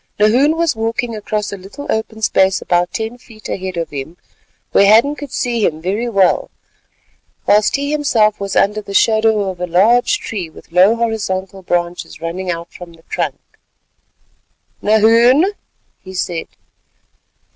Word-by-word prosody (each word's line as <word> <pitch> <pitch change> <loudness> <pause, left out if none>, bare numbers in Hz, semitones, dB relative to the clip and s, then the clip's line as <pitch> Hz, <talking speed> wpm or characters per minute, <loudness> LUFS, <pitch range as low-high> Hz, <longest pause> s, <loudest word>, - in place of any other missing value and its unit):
Nahoon 255 +9 +3
was 335 -5 +1
walking 225 +1 -2
across 210 0 -3
a - - -5
little 195 +10 -10
open 220 0 -3
space 190 -1 +3
about 175 0 0
ten 225 +2 -4
paces 215 -3 -13
ahead 185 -1 -4
of 165 -2 -3
him 145 +4 -7 0.5
where 200 - +5
Hadden 230 +8 +5
could 290 -3 -8
see 235 -3 -1
him 155 -4 0
very 200 +8 -2
well, 195 -5 +2 1.0
whilst 210 0 +3
he 285 +1 -2
himself 230 -8 +2
was 200 -1 -4
under 210 +2 +2
the 200 -1 -8
shadow 220 -3 +3
of 180 -1 -11
a 180 - -2
large 230 - +3
tree 195 - -5
with 160 - -16
low 185 +6 +5
horizontal 195 -5 -3
branches 175 -1 -3
running 180 +3 -4
out 170 -1 -5
from 175 -1 -11
the 165 0 -20
trunk. - - -2 1.4
"Nahoon," 230 - +4 0.5
he 190 0 -11
said. 175 -2 -3
210 Hz, 150 wpm, -17 LUFS, 185-230 Hz, 1.4 s, where